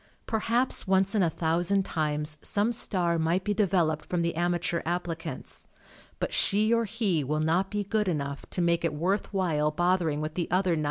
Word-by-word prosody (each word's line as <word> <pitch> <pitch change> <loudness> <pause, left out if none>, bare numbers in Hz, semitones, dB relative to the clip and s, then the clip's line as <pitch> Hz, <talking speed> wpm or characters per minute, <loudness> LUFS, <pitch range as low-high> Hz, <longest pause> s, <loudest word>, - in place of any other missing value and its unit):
Per 220 - -1
haps 235 +2 +2
once 190 +1 +2
in 210 - +2
a 170 - +3
thousand 175 +5 +1
times 150 -2 -1
some 210 +3 +1
star 175 -7 0
might 170 +4 +1
be 210 - 0
developed 175 -6 +1
from 175 -1 -2
the 170 - 0
amateur 175 0 0
applicants, 170 -1 -5 0.5
but - - -3
she 215 +3 +3
or 230 0 +2
he 205 -8 0
will 150 +3 -1
not 165 +5 +1
be 205 -1 -2
good 210 +1 -1
enough 140 -5 -2
to 180 - -2
make 170 -1 +1
it 160 -3 -1
worth 185 +7 -1
while 165 -6 +1
bothering 170 -1 +1
with 155 0 -4
the 175 - -3
other 185 +1 +2
999. 165 - +1
175 Hz, 195 wpm, -28 LUFS, 160-195 Hz, 0.5 s, a